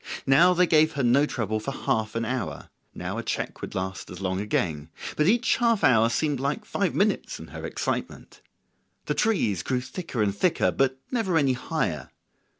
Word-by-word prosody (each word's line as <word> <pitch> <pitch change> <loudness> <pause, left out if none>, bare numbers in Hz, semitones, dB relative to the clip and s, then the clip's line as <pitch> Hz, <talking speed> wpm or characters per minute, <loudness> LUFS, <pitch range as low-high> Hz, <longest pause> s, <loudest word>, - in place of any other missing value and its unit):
Now 170 +7 +5
they 180 +1 +5
gave 155 -1 +4
her 140 -2 -1
no 135 +5 +4
trouble 110 -5 -2
for 110 - -5
half 110 -4 -1
an 115 0 -1
hour; 125 -4 -4 0.2
now - - -4
a - - -4
check - - -3
would - - -6
last 95 -1 -4
as 90 - -8
long 95 -1 -1
again; 80 -7 -1 0.3
but 150 - +2
each 235 +4 +3
half 230 -3 +2
hour 115 -3 +5
seemed 145 +3 0
like 145 - -2
five 200 -3 -1
minutes 205 +2 0
in - - -10
her - - -8
excitement. - - -4 0.6
The - - 0
trees 115 - +1
grew 125 +6 -1
thicker 130 - -3
and 100 -1 0
thicker, 175 - +2
but 135 -1 +1
never 215 -9 +1
any 140 -4 +3
higher. 125 - -2
130 Hz, 185 wpm, -26 LUFS, 110-170 Hz, 0.6 s, Now